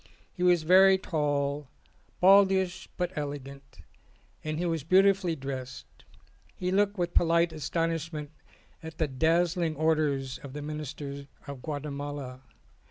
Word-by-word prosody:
He 180 - -9
was 175 -2 +4
very 190 +3 +6
tall, 145 -4 -1 0.5
baldish 190 -1 +4
but 180 +1 -2
elegant, 140 - -7 0.6
and 155 0 -3
he 175 - -1
was 165 -4 -1
beautifully 190 0 +3
dressed: 135 -2 -6 0.7
he 180 0 -2
looked 205 +1 +2
with 175 -1 -2
polite 170 0 +3
astonishment 160 0 -3 0.5
at 160 0 -9
the 160 - +1
dazzling 165 +4 +1
orders 150 -4 0
of 135 -2 -10
the 145 0 -6
Minister 145 -2 -6 0.2
of 140 -3 -8
Guatemala. 145 -3 -5
155 Hz, 120 wpm, -28 LUFS, 140-175 Hz, 0.7 s, very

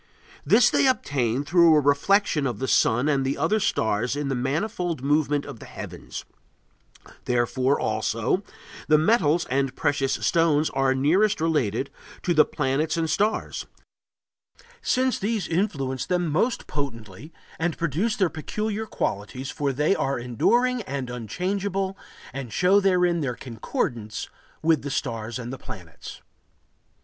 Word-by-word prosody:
This 240 +2 +5
they - - +3
obtain 135 - 0
through 170 0 +5
a - - +6
reflection 145 +2 +2
of 120 -5 -3
the 130 - -3
sun 125 +3 +3
and 140 -3 +2
the 135 +1 -1
other 215 - +1
stars 110 - 0
in 145 -1 -2
the - - 0
manifold 160 - -2
movement 145 0 +1
of - - -9
the - - -11
heavens.... - - -8 1.0
Therefore, 125 +3 +1
also, 110 - 0 0.5
the 155 - +6
metals 170 -2 +3
and 135 0 0
precious 140 -2 0
stones 160 -3 +2
are 135 0 +1
nearest 180 +10 +3
related 140 -6 0 0.3
to 175 - +1
the 155 -2 +6
planets 150 +3 -1
and 165 - +1
the 160 - -2
stars, 210 +8 -1 1.1
since 260 - +1
these 210 -2 -1
influence 140 -8 -1
them 175 -3 0
most 225 - 0
potently 130 - -6 0.3
and 165 0 -1
produce 175 +8 0
their 190 - +2
peculiar 210 +7 -3
qualities, 125 - -3
for 140 -1 -1
they 150 +8 +2
are 135 0 -1
enduring 240 - +1
and 135 - -4
unchangeable 190 - -2 0.4
and 130 -4 -6
show 180 - +4
therein 180 -3 +2
their 125 -4 -2
concordance 115 -2 -4 0.3
[with 160 -2 +3
the 145 - -5
stars 115 -5 -3
and 125 0 -6
the 135 - -7
planets]. 90 -5 -10
145 Hz, 140 wpm, -25 LUFS, 130-180 Hz, 1.1 s, a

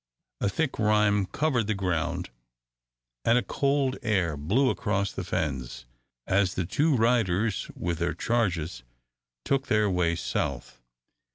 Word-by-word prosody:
A - - +1
thick 150 +5 -2
rime 105 -2 +3
covered 125 0 0
the 110 - 0
ground, 85 -8 -2 0.9
and 115 - +4
a 125 - +2
cold 140 +4 0
air 95 -8 +1
blew 105 - +2
across 100 -3 -1
the 95 - -5
fens, 65 -7 -3 0.4
as 95 -1 +2
the 90 - -1
two 145 - +2
riders 110 -4 +1
with 85 -2 -3
their 85 0 -1
charges 90 - -1 0.6
took 135 0 0
their 105 -2 +2
way 85 -2 +1
south. 65 -6 -3
100 Hz, 130 wpm, -27 LUFS, 85-115 Hz, 0.9 s, and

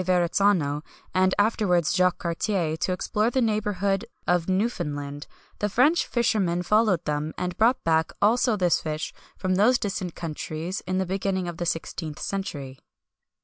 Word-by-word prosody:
Verrazzano, 175 -4 +2 0.3
and 185 0 +3
afterwards, 205 -6 +2
Jacques 180 -1 +3
Cartier, 170 -1 -1
to 170 - -1
explore 210 +4 0
the 260 - 0
neighbourhood 205 -4 0 0.2
of 175 0 +1
Newfoundland, 150 -9 -2 0.3
the 210 - 0
French 285 - +3
fishermen 195 -7 +1
followed 210 -3 +2
them, 150 +1 -2
and 180 0 -3
brought 235 +4 +3
back 160 0 +2
also 230 +2 +3
this 180 -3 +2
fish 155 0 -4 0.2
from 185 -1 0
those 215 +7 +4
distant 195 -5 -3
countries 165 +2 -4
in 185 0 0
the 190 - +1
beginning 190 0 -1
of 170 -1 -5
the 175 - -2
16th 160 -2 -3
century. 145 -9 -5
185 Hz, 145 wpm, -25 LUFS, 165-205 Hz, 0.3 s, those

